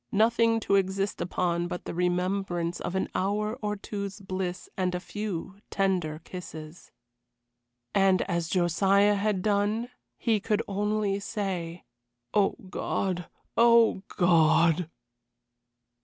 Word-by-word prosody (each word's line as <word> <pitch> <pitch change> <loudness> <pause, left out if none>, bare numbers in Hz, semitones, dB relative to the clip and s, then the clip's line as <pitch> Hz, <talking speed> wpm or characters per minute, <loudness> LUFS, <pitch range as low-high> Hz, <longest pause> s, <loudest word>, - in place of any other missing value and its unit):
Nothing 230 +1 +3
to 200 - +3
exist 195 +1 -1
upon 175 -1 0
but 180 0 -6
the - - -4
remembrance 180 -1 -1
of 185 - -3
an 190 - 0
hour 210 +5 -1
or 210 -1 -1
two's 200 0 -5
bliss 185 -2 -4
and 180 -1 0
a - - -1
few 195 -1 -5
tender 185 -6 0
kisses. 160 -3 -9 1.0
And 195 -1 +4
as 170 -2 -2
Josiah 195 +3 +3
had 200 -2 0
done, 210 +3 +1 0.3
he 225 -3 +1
could 210 +2 0
only 205 0 0
say: 190 -5 -4 0.5
"Oh, 205 -2 +3 0.2
God! 180 -4 -2 0.3
Oh, 230 -4 +5
God!" 165 -1 +3
195 Hz, 115 wpm, -28 LUFS, 175-205 Hz, 1.0 s, Oh